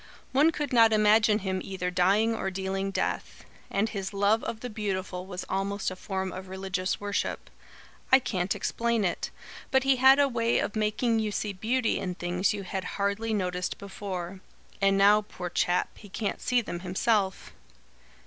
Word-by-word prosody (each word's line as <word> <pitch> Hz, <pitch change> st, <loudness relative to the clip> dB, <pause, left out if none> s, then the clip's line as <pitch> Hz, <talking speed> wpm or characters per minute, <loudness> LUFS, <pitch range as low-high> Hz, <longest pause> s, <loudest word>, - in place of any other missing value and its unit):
One 285 Hz, +5 st, +5 dB
could 295 Hz, -4 st, -3 dB
not 230 Hz, -2 st, +6 dB
imagine 215 Hz, 0 st, +5 dB
him 190 Hz, 0 st, -1 dB
either 180 Hz, -2 st, -3 dB
dying 200 Hz, +5 st, +3 dB
or 205 Hz, -3 st, -2 dB
dealing 190 Hz, +1 st, -2 dB
death. 195 Hz, -, -3 dB, 0.2 s
And 200 Hz, +3 st, +1 dB
his 200 Hz, -2 st, -5 dB
love 205 Hz, +3 st, +3 dB
of 220 Hz, -, -4 dB
the 250 Hz, -, -5 dB
beautiful 190 Hz, -3 st, -3 dB
was 180 Hz, -1 st, -6 dB
almost 195 Hz, 0 st, -1 dB
a -, -, -6 dB
form 190 Hz, 0 st, -3 dB
of 185 Hz, +1 st, -7 dB
religious 190 Hz, 0 st, -2 dB
worship. 205 Hz, 0 st, -3 dB, 0.6 s
I 265 Hz, -, +9 dB
can't 190 Hz, -7 st, -1 dB
explain 235 Hz, -3 st, 0 dB
it; 180 Hz, -, -2 dB, 0.4 s
but 265 Hz, -1 st, +3 dB
he 270 Hz, -1 st, +3 dB
had 265 Hz, +2 st, +7 dB
a 285 Hz, -1 st, +4 dB
way 235 Hz, -2 st, +1 dB
of 205 Hz, -, -1 dB
making 220 Hz, +2 st, +1 dB
you 215 Hz, -1 st, -1 dB
see 205 Hz, 0 st, -2 dB
beauty 225 Hz, +5 st, 0 dB
in 180 Hz, -1 st, -3 dB
things 180 Hz, +1 st, 0 dB
you 205 Hz, -1 st, -4 dB
had 190 Hz, +1 st, -4 dB
hardly 200 Hz, +3 st, -1 dB
noticed 180 Hz, -3 st, -1 dB
before. 190 Hz, -2 st, -6 dB, 0.4 s
And 195 Hz, 0 st, +4 dB
now, 205 Hz, +2 st, +6 dB
poor 180 Hz, -4 st, -7 dB
chap, 175 Hz, +1 st, 0 dB
he 205 Hz, -, -13 dB
can't 205 Hz, +2 st, -3 dB
see 250 Hz, -1 st, +2 dB
them 175 Hz, -6 st, -5 dB
himself." 190 Hz, +2 st, 0 dB
200 Hz, 175 wpm, -28 LUFS, 190-225 Hz, 0.6 s, I